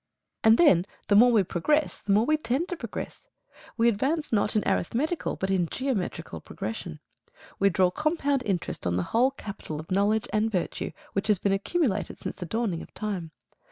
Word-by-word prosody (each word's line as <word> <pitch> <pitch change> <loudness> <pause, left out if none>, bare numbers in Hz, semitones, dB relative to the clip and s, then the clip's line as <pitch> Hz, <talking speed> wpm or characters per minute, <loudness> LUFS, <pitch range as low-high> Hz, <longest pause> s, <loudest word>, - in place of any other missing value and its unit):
And 220 +1 +7
then 190 - +5 0.2
the 205 - +5
more 245 +4 +7
we 220 -4 +4
progress 295 - 0
the 205 - -3
more 210 +3 +4
we 310 - +3
tend 305 +4 -1
to 360 - -2
progress. 430 - -7 0.5
We 230 0 +4
advance 270 +7 0
not 210 0 +2
in 215 - +1
arithmetical 300 - 0
but 190 0 -2
in 180 -3 +2
geometrical 255 -9 -3
progression. 95 -8 -6 0.6
We 200 - +5
draw 185 -1 +3
compound 285 - 0
interest 185 - -2
on 90 0 0
the 90 - 0
whole 245 +3 +5
capital 200 - -7
of 155 - -10
knowledge 205 +3 +2
and 215 +1 +2
virtue 180 -4 -2 0.2
which 195 - -1
has 210 -2 +4
been 195 +2 +1
accumulated 210 - -1
since - - -5
the 180 - -6
dawning 215 -5 -1
of - - -12
time. 195 -6 -3
210 Hz, 185 wpm, -27 LUFS, 190-265 Hz, 0.6 s, And